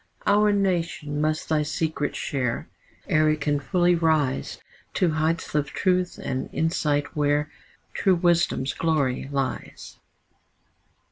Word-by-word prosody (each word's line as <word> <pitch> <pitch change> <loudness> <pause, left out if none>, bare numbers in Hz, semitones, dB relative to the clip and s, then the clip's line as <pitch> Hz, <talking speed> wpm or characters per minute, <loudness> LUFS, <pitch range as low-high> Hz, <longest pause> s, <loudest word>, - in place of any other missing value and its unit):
Our 210 +1 +4
nation 170 -7 -1
must 155 0 0
thy 155 -1 +2
secret 150 0 -2
share, 125 -4 -2 0.4
Ere 155 0 +3
it 155 0 0
can 145 0 +1
fully 175 +3 +2
rise 155 -5 +1 0.4
To 175 -3 +2
heights 155 +2 -1
of 150 -1 +1
truth 180 -1 0
and 130 -1 -4
insight 150 -3 0
where 150 0 +1 0.4
True 190 -2 +3
wisdom's 170 -6 +1
glory 140 -5 0
lies. 135 -2 -4
155 Hz, 120 wpm, -25 LUFS, 145-170 Hz, 0.4 s, Our